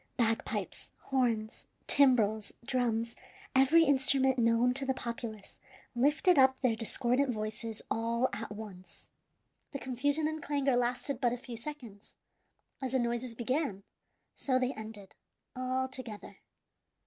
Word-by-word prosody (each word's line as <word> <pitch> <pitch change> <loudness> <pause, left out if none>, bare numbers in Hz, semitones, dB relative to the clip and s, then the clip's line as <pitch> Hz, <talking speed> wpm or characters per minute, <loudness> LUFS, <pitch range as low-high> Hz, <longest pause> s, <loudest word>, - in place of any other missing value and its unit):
Bagpipes, 225 -2 -1
horns, 230 -5 -1 0.2
timbrels, 220 -7 +3
drums, 235 -2 0 0.4
every 275 +6 +6
instrument 265 -2 +3
known 230 +2 +3
to 270 +2 +2
the 265 -1 0
populace, 230 -4 -6 0.3
lifted 295 +7 +3
up 265 0 +5
their 250 -4 +2
discordant 250 +4 +1
voices 220 0 -5
all 230 +2 +1
at 215 +2 -5
once. 195 -4 -10 0.6
The - - -2
confusion 285 +4 0
and 315 0 -4
clangor 280 -3 +1
lasted 245 +2 -1
but 240 -2 +2
a - - -3
few 245 -1 -8
seconds. 230 -5 -9 0.7
As 260 -1 -3
the - - +4
noises 240 0 -2
began, 240 -4 -1 0.5
so 260 -2 0
they 255 +1 0
ended, 215 -3 -9 0.4
all 255 +1 -1
together. 255 -5 -8
245 Hz, 125 wpm, -31 LUFS, 225-265 Hz, 0.7 s, every